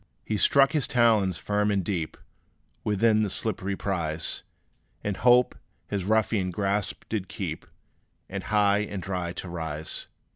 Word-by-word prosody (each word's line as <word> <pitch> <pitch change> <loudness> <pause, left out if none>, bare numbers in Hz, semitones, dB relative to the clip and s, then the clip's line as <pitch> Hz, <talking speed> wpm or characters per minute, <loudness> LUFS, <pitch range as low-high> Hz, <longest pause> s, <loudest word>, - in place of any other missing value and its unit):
He 110 - -1
struck 135 +6 +5
his 150 -7 +1
talons 110 -7 +3
firm 105 0 0
and 100 -3 +1
deep, 80 -5 -2 0.7
Within 110 +1 +3
the 105 - +1
slippery 100 -1 -1
prize, 85 -6 -1 0.6
In 105 - -1
hope 125 +4 +4 0.4
his 100 -3 -2
ruffian 105 -2 +2
grasp 100 +2 -1
to 110 - 0
keep; 90 -4 -6 0.6
And 95 0 -5
high 105 -1 +3
and 100 -3 -4
dry 90 -3 -2
to 95 - -6
rise. 80 -2 -4
100 Hz, 140 wpm, -27 LUFS, 90-110 Hz, 0.7 s, struck